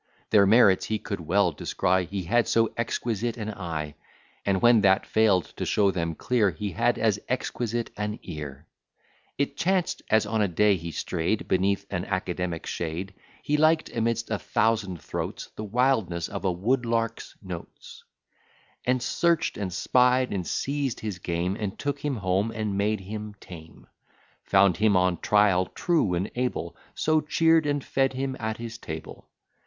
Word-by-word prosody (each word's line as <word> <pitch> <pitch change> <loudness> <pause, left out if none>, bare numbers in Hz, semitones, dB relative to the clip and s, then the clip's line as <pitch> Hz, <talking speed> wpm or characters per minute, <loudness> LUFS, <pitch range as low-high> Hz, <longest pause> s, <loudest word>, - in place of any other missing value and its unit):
Their 100 -2 +6
merits 105 -3 +5
he 110 - 0
could 100 -2 -5
well 90 +3 +2
descry, 90 +4 0
He 95 -1 -4
had 120 +7 +2
so 115 -1 +2
exquisite 115 0 -2
an 110 -1 -4
eye; 80 -6 -4 0.5
And 95 -1 +1
when 120 0 +5
that 95 -1 +4
fail'd 105 -5 +2
to - - -2
show 100 -2 +3
them 85 -3 -2
clear, 115 -1 +2
He 95 +4 -4
had - - +1
as - - +1
exquisite 120 0 -2
an 105 +1 -3
ear; 75 -3 -7 0.7
It 140 0 -1
chanced 185 -1 0
as 110 0 +4
on 110 +1 0
a 105 - +3
day 100 +3 +3
he 85 -1 -6
stray'd 85 +5 -2
Beneath 100 +1 +1
an 90 +1 -2
academic 90 -3 -3
shade, 85 +3 -4 0.3
He 150 - +1
liked, 155 +1 +2
amidst 115 0 -1
a 105 - 0
thousand 105 -6 0
throats, - - -5
The 110 - -5
wildness 105 -7 +1
of 100 -2 -5
a 95 - +3
Woodlark's 115 +3 -1
notes, 90 -3 -9 0.8
And 125 0 +1
search'd, 170 +4 +1
and 100 -3 -3
spied, 125 +6 +2
and 90 -4 -3
seized 140 -3 -2
his 105 -4 -4
game, 85 +2 -1
And 105 -2 -4
took 145 0 -3
him 145 -2 0
home, 95 0 0
and 110 -3 -3
made 105 +1 0
him 105 +2 -7
tame; 80 -2 -12 0.6
Found 95 -2 +4
him 105 -3 +3
on 90 -1 +2
trial 100 -3 +3
true 155 - +1
and 95 +4 -2
able, 125 0 -2 0.2
So 155 0 +2
cheer'd 160 0 +3
and 145 -1 0
fed 135 0 +1
him 135 0 -2
at 110 -1 -3
his 115 0 -7
table. 80 -5 -8
105 Hz, 165 wpm, -26 LUFS, 90-120 Hz, 0.8 s, Their